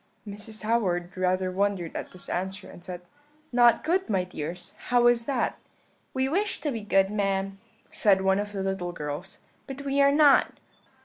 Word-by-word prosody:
"Mrs. 215 Hz, +2 st, -6 dB
Howard 190 Hz, -6 st, 0 dB
rather 185 Hz, 0 st, 0 dB
wondered 190 Hz, -3 st, -1 dB
at -, -, -5 dB
this 180 Hz, -, -10 dB
answer, 190 Hz, +2 st, -3 dB
and 175 Hz, -, -13 dB
said: 180 Hz, 0 st, -7 dB, 0.5 s
"'Not 240 Hz, -1 st, +5 dB
good, 370 Hz, +4 st, 0 dB
my 190 Hz, -3 st, +1 dB
dears, 175 Hz, 0 st, -7 dB
how 245 Hz, -1 st, +3 dB
is 240 Hz, -1 st, +4 dB
that?' 275 Hz, 0 st, -1 dB, 0.6 s
"'We 260 Hz, 0 st, +1 dB
wish 400 Hz, +7 st, 0 dB
to 295 Hz, -, -1 dB
be 230 Hz, -4 st, -4 dB
good, 195 Hz, -1 st, +2 dB
ma'am,' 195 Hz, -1 st, -1 dB, 0.3 s
said 195 Hz, -3 st, +3 dB
one 190 Hz, +1 st, +2 dB
of 205 Hz, 0 st, -3 dB
the 195 Hz, -2 st, -3 dB
little 190 Hz, -2 st, -2 dB
girls, 150 Hz, +4 st, -6 dB, 0.3 s
'but 270 Hz, +1 st, -7 dB
we 280 Hz, 0 st, +1 dB
are 280 Hz, 0 st, +6 dB
not.' 290 Hz, -1 st, +5 dB
200 Hz, 175 wpm, -27 LUFS, 185-240 Hz, 0.6 s, are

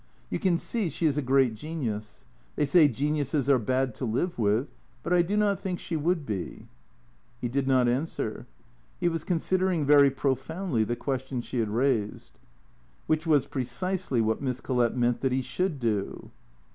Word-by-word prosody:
" -, -, -33 dB
You -, -, -1 dB
can 180 Hz, -3 st, +2 dB
see 215 Hz, 0 st, -1 dB
she 165 Hz, -, -2 dB
is 150 Hz, -3 st, +3 dB
a 150 Hz, -, 0 dB
great 135 Hz, -2 st, +3 dB
genius. 110 Hz, -, -5 dB, 0.3 s
They -, -, +1 dB
say 150 Hz, +2 st, +6 dB
geniuses 145 Hz, +1 st, -1 dB
are 130 Hz, -, +5 dB
bad 130 Hz, +2 st, 0 dB
to 120 Hz, -, -8 dB
live 125 Hz, +8 st, -1 dB
with. 105 Hz, -1 st, +2 dB, 0.4 s
But -, -, 0 dB
I 175 Hz, -, +5 dB
do 195 Hz, +5 st, -1 dB
not 205 Hz, -2 st, +2 dB
think 190 Hz, -3 st, -3 dB
she 170 Hz, -, -4 dB
would 160 Hz, 0 st, 0 dB
be." 95 Hz, -7 st, -5 dB, 0.7 s
He 120 Hz, -, -2 dB
did 135 Hz, +2 st, -1 dB
not 130 Hz, -2 st, +4 dB
answer. 130 Hz, +7 st, -2 dB, 0.5 s
He -, -, +1 dB
was 165 Hz, -2 st, -1 dB
considering 180 Hz, -1 st, 0 dB
very 140 Hz, -1 st, +7 dB
profoundly 135 Hz, -, -1 dB
the 120 Hz, +3 st, -2 dB
question 130 Hz, 0 st, -3 dB
she 120 Hz, -, -4 dB
had 110 Hz, -2 st, 0 dB
raised, 115 Hz, -2 st, -1 dB, 0.7 s
WHiich 155 Hz, +1 st, 0 dB
was 150 Hz, -4 st, +4 dB
precisely 135 Hz, +2 st, -2 dB
what 110 Hz, +2 st, 0 dB
Miss 130 Hz, -2 st, -2 dB
Collett 125 Hz, -2 st, 0 dB
meant 120 Hz, -1 st, +1 dB
that 135 Hz, -, +1 dB
he 130 Hz, 0 st, 0 dB
should 180 Hz, 0 st, -2 dB
do. 105 Hz, -5 st, -2 dB
135 Hz, 180 wpm, -27 LUFS, 120-165 Hz, 0.7 s, very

